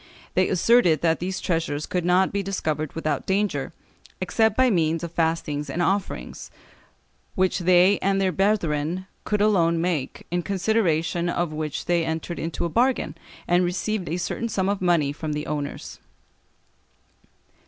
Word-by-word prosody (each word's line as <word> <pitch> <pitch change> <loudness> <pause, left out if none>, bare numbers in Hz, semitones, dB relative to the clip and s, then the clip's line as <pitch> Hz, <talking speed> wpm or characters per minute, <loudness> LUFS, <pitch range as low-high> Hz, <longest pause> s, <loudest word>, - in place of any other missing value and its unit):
They 185 - +2
asserted 180 - +4
that 165 -1 +2
these 185 +2 -3
treasures 165 -4 -1
could 180 -1 -2
not 180 +2 +3
be 200 - -1
discovered 155 -6 -2
without 155 -3 -2
danger, 200 +1 0 0.5
except 220 -2 +1
by 260 -1 +4
means 165 -3 +1
of 170 - -4
fastings 160 -3 -1
and 150 - -3
offerings, 180 - -2 0.9
which 185 +1 +1
they 185 +2 +4
and 195 0 +1
their 190 -1 +2
brethren 180 -4 0 0.2
could 210 -1 0
alone 170 -6 +3
make, 165 -6 -2
in 175 0 0
consideration 175 -4 0
of 175 -2 -1
which 155 -1 -4
they 170 -1 +2
entered 160 +1 -3
into 165 0 -3
a - - +1
bargain, 250 +8 +1 0.3
and 175 +1 +3
received 180 +2 -2
a 170 - -1
certain 230 +6 -3
sum 195 -3 0
of 200 -1 -1
money 170 -6 +2
from 150 0 -4
the 150 +1 -3
owners. 145 -1 -5
175 Hz, 155 wpm, -24 LUFS, 160-195 Hz, 0.9 s, asserted